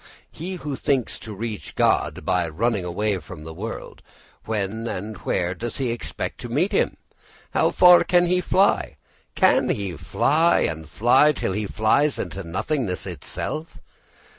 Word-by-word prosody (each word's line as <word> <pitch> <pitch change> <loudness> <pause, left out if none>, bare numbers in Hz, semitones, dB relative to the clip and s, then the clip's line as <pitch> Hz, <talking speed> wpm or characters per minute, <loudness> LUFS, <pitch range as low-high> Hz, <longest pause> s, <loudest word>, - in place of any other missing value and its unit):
He 185 +4 -6
who 150 -5 -4
thinks 130 -2 -1
to 110 -2 -8
reach 110 0 -6
God - - +1
by 90 -2 +1
running 105 +4 0
away 95 +3 -1
from 75 0 -10
the 80 +1 -8
world, 110 +7 -7 0.4
when 110 +1 -2
and 105 +1 -4
where 90 0 -1
does 115 +5 -5
he 130 -4 -1
expect 120 - -5
to 120 - -7
meet 155 - +1
him? - - +1 0.5
How - - +3
far 180 -1 +7
can 175 -1 +3
he 180 +1 +2
fly 195 +2 +2 0.4
can - - +4
he 100 -4 -2
fly 160 - +2
and 80 -1 -2
fly, 120 - +4
till 115 - -2
he 105 +2 -2
flies 130 +9 +2
into 100 - -5
nothingness 95 - -2
itself? 135 - -5
110 Hz, 155 wpm, -23 LUFS, 95-150 Hz, 0.5 s, far